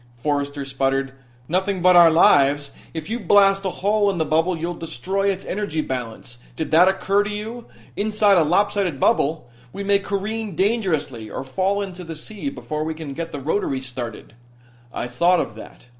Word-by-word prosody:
Forrester 140 Hz, +2 st, -2 dB
sputtered: 135 Hz, 0 st, -1 dB, 0.3 s
"Nothing 190 Hz, +1 st, -1 dB
but 180 Hz, 0 st, +6 dB
our 170 Hz, -1 st, +9 dB
lives! 145 Hz, -3 st, +4 dB, 0.2 s
If 160 Hz, -2 st, -6 dB
you 230 Hz, +3 st, -3 dB
blast 195 Hz, 0 st, +4 dB
a -, -, +1 dB
hole 205 Hz, +2 st, +1 dB
in 195 Hz, -, -2 dB
the 160 Hz, -, 0 dB
bubble 165 Hz, +4 st, +1 dB
you'll 170 Hz, +2 st, -3 dB
destroy 175 Hz, +5 st, -2 dB
its 195 Hz, -1 st, -3 dB
energy 190 Hz, -6 st, -2 dB
balance. 120 Hz, -2 st, -6 dB, 0.2 s
Did 160 Hz, -, -4 dB
that 170 Hz, +3 st, +6 dB
occur 195 Hz, +1 st, +2 dB
to 205 Hz, -, -3 dB
you? 220 Hz, +3 st, -6 dB, 0.3 s
Inside 210 Hz, -2 st, +3 dB
a -, -, +4 dB
lopsided 185 Hz, -1 st, +1 dB
bubble 160 Hz, -, +1 dB, 0.2 s
we 200 Hz, -, -6 dB
may 200 Hz, 0 st, +3 dB
careen 205 Hz, 0 st, -3 dB
dangerously 160 Hz, -, -1 dB
or -, -, -5 dB
fall 190 Hz, +9 st, -1 dB
into 185 Hz, -2 st, -7 dB
the 165 Hz, -1 st, -7 dB
sea 210 Hz, -, -5 dB
before 155 Hz, -, -5 dB
we 160 Hz, 0 st, -3 dB
can 155 Hz, -3 st, -7 dB
get 165 Hz, +3 st, -5 dB
the 145 Hz, -, -5 dB
rotaries 135 Hz, -3 st, -2 dB
started." 120 Hz, -4 st, -7 dB, 0.6 s
"I -, -, -4 dB
thought 170 Hz, +9 st, +2 dB
of 115 Hz, -, -3 dB
that. 110 Hz, -, -13 dB
170 Hz, 180 wpm, -22 LUFS, 145-200 Hz, 0.6 s, our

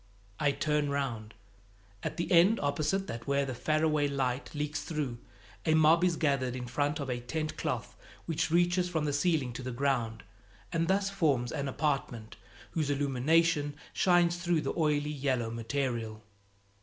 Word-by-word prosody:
I 145 Hz, -1 st, +3 dB
turn 150 Hz, 0 st, 0 dB
round. 120 Hz, -6 st, -3 dB, 0.7 s
At -, -, -4 dB
the 170 Hz, -, -2 dB
end 185 Hz, +6 st, +6 dB
opposite 155 Hz, +7 st, 0 dB
that 115 Hz, -5 st, -7 dB
where 140 Hz, 0 st, +2 dB
the 130 Hz, -, -4 dB
faraway 155 Hz, +3 st, +1 dB
light 135 Hz, -2 st, -1 dB
leaks 150 Hz, 0 st, -2 dB
through, 145 Hz, -7 st, -3 dB, 0.4 s
a 160 Hz, -, +3 dB
mob 160 Hz, +2 st, +5 dB
is 180 Hz, -2 st, +3 dB
gathered 135 Hz, -5 st, 0 dB
in 125 Hz, -1 st, -4 dB
front 145 Hz, +4 st, -1 dB
of 140 Hz, -, -3 dB
a 125 Hz, -1 st, -2 dB
tent 155 Hz, +6 st, -3 dB
cloth -, -, -3 dB, 0.3 s
which 165 Hz, -1 st, -1 dB
reaches 175 Hz, +2 st, +2 dB
from 160 Hz, -3 st, -1 dB
the 145 Hz, -, 0 dB
ceiling 145 Hz, -5 st, +1 dB
to 125 Hz, -, -6 dB
the 130 Hz, 0 st, -4 dB
ground, 120 Hz, -4 st, -1 dB, 0.5 s
and 165 Hz, 0 st, +1 dB
thus 195 Hz, +1 st, +1 dB
forms 140 Hz, -11 st, +1 dB
an 140 Hz, -, -2 dB
apartment, 135 Hz, -6 st, -2 dB, 0.4 s
whose 155 Hz, -3 st, -1 dB
illumination 145 Hz, +2 st, +2 dB, 0.2 s
shines 175 Hz, -1 st, +3 dB
through 175 Hz, -2 st, +1 dB
the -, -, -2 dB
oily 150 Hz, -2 st, +1 dB
yellow 130 Hz, -5 st, -1 dB
material. 115 Hz, -2 st, -3 dB
145 Hz, 160 wpm, -30 LUFS, 130-160 Hz, 0.7 s, end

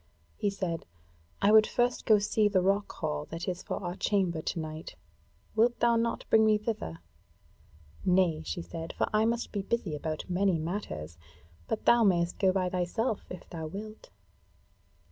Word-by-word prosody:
He 205 Hz, -, 0 dB
said: 185 Hz, -4 st, -3 dB, 0.6 s
"I 200 Hz, -, +6 dB
would 215 Hz, 0 st, +7 dB
first 245 Hz, 0 st, 0 dB
go 215 Hz, -, +7 dB
see 210 Hz, +1 st, +2 dB
the 190 Hz, -3 st, +2 dB
rock 200 Hz, +2 st, +1 dB
hall 75 Hz, 0 st, -3 dB
that 165 Hz, +1 st, -5 dB
is 180 Hz, -1 st, -2 dB
for -, -, -4 dB
our 175 Hz, 0 st, -3 dB
chamber 185 Hz, -6 st, 0 dB
to 165 Hz, -, -3 dB
night; 155 Hz, 0 st, -6 dB, 0.6 s
wilt 235 Hz, +2 st, +3 dB
thou 235 Hz, 0 st, +4 dB
not 230 Hz, 0 st, 0 dB
bring 220 Hz, 0 st, +6 dB
me 215 Hz, 0 st, +5 dB
in 210 Hz, -, -3 dB
thither?" 90 Hz, -, -4 dB, 1.0 s
"Nay," 180 Hz, -4 st, +3 dB
she 170 Hz, +2 st, -4 dB
said, 165 Hz, -1 st, -7 dB
"for -, -, 0 dB
I 215 Hz, +1 st, +4 dB
must 235 Hz, +1 st, -1 dB
be 200 Hz, -, -2 dB
busy 200 Hz, -4 st, -2 dB
about 155 Hz, +1 st, -4 dB
many 185 Hz, 0 st, +2 dB
matters; 125 Hz, -, -5 dB, 0.5 s
but -, -, -3 dB
thou 235 Hz, -1 st, +6 dB
mayst 175 Hz, -4 st, +2 dB
go 190 Hz, -2 st, +4 dB
by 185 Hz, -1 st, 0 dB
thyself, 190 Hz, +5 st, -1 dB
if 180 Hz, -, -9 dB
thou 160 Hz, -2 st, -5 dB
wilt." 215 Hz, +6 st, -8 dB
190 Hz, 175 wpm, -30 LUFS, 170-215 Hz, 1.0 s, would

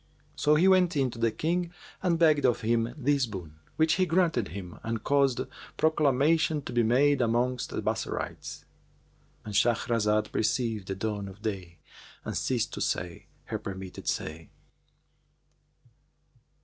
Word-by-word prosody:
'[FN#401] -, -, -15 dB
So 150 Hz, +1 st, +5 dB
he 170 Hz, +5 st, +4 dB
went 180 Hz, -4 st, +4 dB
in 135 Hz, -3 st, +1 dB
to 115 Hz, -, -9 dB
the 115 Hz, 0 st, +3 dB
King 170 Hz, +7 st, -1 dB, 0.3 s
and 175 Hz, -3 st, +2 dB
begged 155 Hz, -3 st, +4 dB
of 120 Hz, -2 st, +2 dB
him 115 Hz, +1 st, +1 dB
this 140 Hz, -2 st, +1 dB
boon, 85 Hz, -7 st, -8 dB, 0.2 s
which 160 Hz, 0 st, +3 dB
he 185 Hz, -, +3 dB
granted 165 Hz, -, +2 dB
him 90 Hz, -2 st, -8 dB
and 115 Hz, -1 st, -3 dB
caused 140 Hz, -3 st, +2 dB, 0.4 s
proclamation 155 Hz, 0 st, +2 dB
to 125 Hz, -, -6 dB
be 120 Hz, -, +3 dB
made 130 Hz, +5 st, +3 dB
amongst 120 Hz, +2 st, 0 dB
the -, -, -4 dB
Bassorites,"—And 105 Hz, -, -7 dB
Shahrazad 110 Hz, -1 st, +2 dB
perceived 110 Hz, -3 st, -1 dB
the 95 Hz, -, -3 dB
dawn 100 Hz, 0 st, -3 dB
of 100 Hz, +2 st, -12 dB
day 95 Hz, -6 st, -4 dB, 0.5 s
and -, -, -4 dB
ceased -, -, -1 dB
to -, -, -5 dB
say 90 Hz, -2 st, -2 dB, 0.2 s
her -, -, -4 dB
permitted 95 Hz, -1 st, -7 dB
say. 80 Hz, 0 st, -3 dB
120 Hz, 145 wpm, -28 LUFS, 105-150 Hz, 0.5 s, So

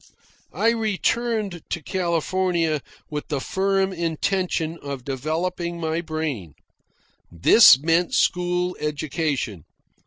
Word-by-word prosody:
I 225 Hz, -, +3 dB
returned 220 Hz, -3 st, -1 dB
to 170 Hz, -, -3 dB
California 170 Hz, -2 st, 0 dB, 0.3 s
with 150 Hz, -1 st, -4 dB
the 145 Hz, -, -2 dB
firm 195 Hz, +4 st, 0 dB
intention 170 Hz, -1 st, -1 dB
of 140 Hz, -3 st, -6 dB
developing 170 Hz, +5 st, -3 dB
my 160 Hz, 0 st, -1 dB
brain. 155 Hz, -, -4 dB, 0.8 s
This 130 Hz, -, +7 dB
meant 165 Hz, +5 st, +1 dB
school 180 Hz, 0 st, +1 dB
education. 150 Hz, -, -2 dB
170 Hz, 95 wpm, -23 LUFS, 150-185 Hz, 0.8 s, This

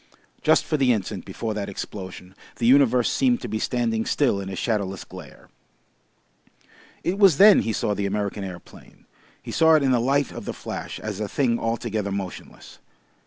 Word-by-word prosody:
Just -, -, +3 dB
for 155 Hz, -, 0 dB
the 135 Hz, -3 st, +3 dB
instant 105 Hz, -5 st, -3 dB
before 110 Hz, -2 st, -4 dB
that 100 Hz, -1 st, -4 dB
explosion 95 Hz, -2 st, -8 dB, 0.2 s
the 115 Hz, -, -3 dB
universe 125 Hz, -1 st, +4 dB
seemed 250 Hz, -3 st, +2 dB
to -, -, -5 dB
be 110 Hz, -, -3 dB
standing 115 Hz, -2 st, -1 dB
still 120 Hz, -8 st, +1 dB
in 95 Hz, -, -6 dB
a 95 Hz, -, -5 dB
shadowless 100 Hz, -3 st, -2 dB
glare. 90 Hz, -7 st, -13 dB, 1.6 s
It 190 Hz, +3 st, -1 dB
was 190 Hz, -8 st, +6 dB
then 205 Hz, +3 st, +8 dB
he 115 Hz, -, -1 dB
saw 105 Hz, -, -1 dB
the 100 Hz, 0 st, -2 dB
American 100 Hz, 0 st, -3 dB
aeroplane. 90 Hz, -3 st, -11 dB, 0.4 s
He -, -, -7 dB
saw 160 Hz, 0 st, +5 dB
it 155 Hz, -, +3 dB
in 135 Hz, -, +2 dB
the 125 Hz, -, +3 dB
light 140 Hz, +3 st, +1 dB
of -, -, -8 dB
the -, -, -4 dB
flash -, -, -7 dB
as 105 Hz, -2 st, -5 dB
a 105 Hz, -, -2 dB
thing 120 Hz, +1 st, 0 dB
altogether 115 Hz, -3 st, -2 dB
motionless. 95 Hz, -2 st, -7 dB
110 Hz, 180 wpm, -24 LUFS, 100-135 Hz, 1.6 s, then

